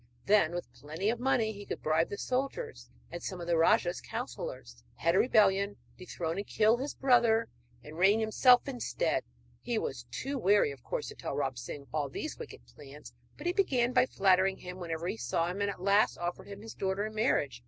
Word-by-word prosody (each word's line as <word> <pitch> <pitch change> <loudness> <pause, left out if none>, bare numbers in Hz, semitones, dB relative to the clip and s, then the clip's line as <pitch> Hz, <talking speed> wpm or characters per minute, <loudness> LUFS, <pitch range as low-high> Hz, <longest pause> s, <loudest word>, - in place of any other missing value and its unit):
Then, 195 -5 +3
with 175 - -6
plenty 160 +9 -2
of 235 - -4
money, 245 -4 +1
he 205 -1 -9
could - - -6
bribe 155 +2 +2
the 200 - -5
soldiers 275 - -3 0.2
and 175 - -6
some 185 - -5
of 170 - -5
the 170 0 +1
rajah's 175 +2 +3
counsellors, - - -7
head 170 +1 +1
a 190 - +4
rebellion, 200 -4 +3 0.2
dethrone 175 -2 -4
and 200 - -4
kill 220 +2 +3
his 275 +4 -4
brother, 235 -4 +3 0.3
and 155 +5 -10
reign 200 +4 +5
himself 245 +4 +4
instead. 270 - -1 0.4
He 240 -2 -2
was 125 - -4
too 270 - -4
wary, 200 -7 +3
of 135 -3 -11
course, - - -4
to - - -10
tell - - -5
Ram 135 -1 -1
Singh 125 +4 -7
of 140 - -25
all 150 -3 -1
these - - -5
wicked - - -10
plans; 135 - -13 0.2
but 295 - -10
he 350 - +1
began 255 -11 +1
by 250 0 +4
flattering 190 -2 +3
him 180 0 -9
whenever 165 -1 -4
he 115 - -3
saw 165 +9 -1
him, 195 +3 -5
and 200 - +1
at 200 - -6
last 200 +2 +3
offered 175 0 -4
him 200 0 -9
his 225 - -8
daughter 195 +1 -2
in 215 - -6
marriage. 145 - 0
195 Hz, 210 wpm, -31 LUFS, 165-225 Hz, 0.4 s, reign